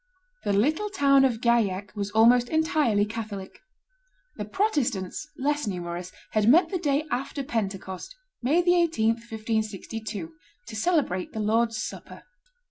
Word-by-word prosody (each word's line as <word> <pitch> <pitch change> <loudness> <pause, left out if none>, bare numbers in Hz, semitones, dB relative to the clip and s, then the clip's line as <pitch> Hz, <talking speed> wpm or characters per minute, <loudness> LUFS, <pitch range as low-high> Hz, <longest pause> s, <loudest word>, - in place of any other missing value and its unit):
The 205 - +1
little 305 - +1
town 280 -8 +4
of 240 -4 +1
Gaillac 210 -5 +1
was 200 -1 -2
almost 235 +3 +5
entirely 305 -10 +2
Catholic; 210 -3 -6 0.8
the 210 - -5
Protestants, 240 - -1
less 290 -1 0
numerous, 175 -1 -4 0.2
had 215 0 +3
met 330 +5 +6
the 370 - -2
day 295 -2 +1
after 270 +3 -2
Pentecost, 195 - -4 0.3
May 290 +8 +3
18, 340 -10 +3
1562, 220 -4 -3 0.3
to - - -9
celebrate 215 - 0
the 220 - -4
Lord's 225 +1 +1
Supper. 215 - -7
225 Hz, 125 wpm, -26 LUFS, 205-285 Hz, 0.8 s, met